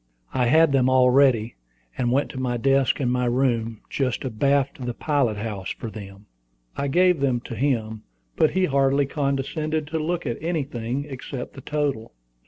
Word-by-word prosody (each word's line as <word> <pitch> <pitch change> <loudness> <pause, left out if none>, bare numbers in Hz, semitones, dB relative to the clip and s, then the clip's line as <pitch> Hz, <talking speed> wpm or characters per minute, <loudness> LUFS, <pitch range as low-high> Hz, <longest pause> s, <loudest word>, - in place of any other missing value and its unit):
I 125 -2 +2
had 160 +3 +5
them 130 -2 +3
all 130 -1 +5
ready, 125 -4 +3 0.4
and 120 -2 0
went 140 +3 +1
to 130 - -6
my 125 -2 -1
desk 135 0 +2
in 125 -3 0
my 125 0 +1
room, 120 -3 0
just 130 -1 -2
abaft 135 +2 0
the 120 -1 -3
pilot 140 -8 0
house, 105 -3 -4
for 115 - -6
them. 100 -1 -10 0.5
I 140 - -2
gave 180 +3 +3
them 130 -3 +1
to 120 - -8
him, 110 -4 -1 0.3
but - - +4
he 190 0 +1
hardly 140 -1 +2
condescended 145 +3 -2
to 160 - -2
look 170 +2 -2
at 120 -3 -3
anything 140 -5 -2
except 130 -2 -7
the 135 - -10
total. 140 - -2
130 Hz, 175 wpm, -24 LUFS, 120-140 Hz, 0.5 s, had